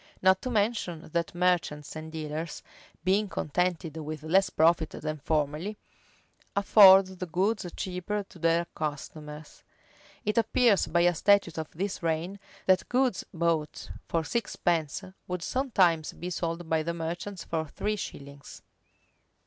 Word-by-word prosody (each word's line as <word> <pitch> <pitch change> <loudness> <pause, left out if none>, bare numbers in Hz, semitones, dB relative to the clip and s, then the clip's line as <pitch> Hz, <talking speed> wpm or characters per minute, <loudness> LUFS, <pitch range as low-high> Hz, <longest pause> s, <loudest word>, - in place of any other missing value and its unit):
Not 190 0 +4
to 255 - -3
mention, 205 -8 -1
that 170 0 -1
merchants 175 -5 0
and 155 0 -7
dealers, 155 0 -5 0.4
being 195 +3 +2
contented 165 0 -1
with 155 -1 -6
less 185 +4 +3
profit 165 -1 +3
than 155 0 -5
formerly, 155 +7 -1 0.8
afford 195 -1 +8
the 185 -1 -7
goods 190 +4 0
cheaper 190 +3 -3
to 175 - -15
their 165 +1 +2
customers. 150 0 -6 0.6
It 210 +2 +2
appears 225 -2 +3
by 170 +1 +2
a 175 0 +4
statute 190 -2 +3
of 155 - -5
this 190 +4 -4
reign,[v] 170 +4 -2 0.3
that 185 -1 +3
goods 250 -5 +1
bought 165 -3 -1 0.2
for 165 -1 0
sixteenpence 170 -7 -1 0.2
would 180 -1 -3
sometimes 185 - +2
be 180 +2 -6
sold 170 -1 -3
by 160 0 +1
the 170 +2 -3
merchants 170 +4 -5
for 160 -1 -3
three 210 +8 -2
shillings. 140 -7 -9
170 Hz, 135 wpm, -28 LUFS, 160-190 Hz, 0.8 s, afford